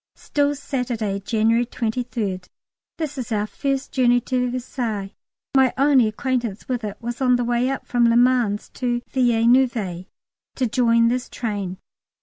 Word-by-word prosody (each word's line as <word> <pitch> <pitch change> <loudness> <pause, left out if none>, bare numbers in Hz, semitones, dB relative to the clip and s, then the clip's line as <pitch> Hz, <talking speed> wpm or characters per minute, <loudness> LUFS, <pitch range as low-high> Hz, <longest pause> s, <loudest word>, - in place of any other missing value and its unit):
Still 290 0 0
Saturday, 240 -8 -2
January 225 +3 +1
23rd. 220 -6 -3 0.5
This 295 -4 -4
is 250 -1 -5
our 210 -1 +1
first 275 +4 -3
journey 245 -2 +3
to 250 +1 -1
Versailles. 235 -5 -4 0.4
My 265 -2 +4
only 270 -4 +4
acquaintance 235 -2 -2
with 250 -3 -2
it 205 -2 -5
was 240 +2 -5
on 250 -1 +4
the 245 0 0
way 240 +2 +1
up 270 - -3
from 240 -1 +3
Le 230 - +4
Mans 245 -4 +2
to 240 -1 -2
Villeneuve 235 -6 +2 0.5
to 255 - 0
join 230 0 +3
this 250 +1 -2
train. 205 -5 -4
240 Hz, 145 wpm, -22 LUFS, 220-255 Hz, 0.5 s, My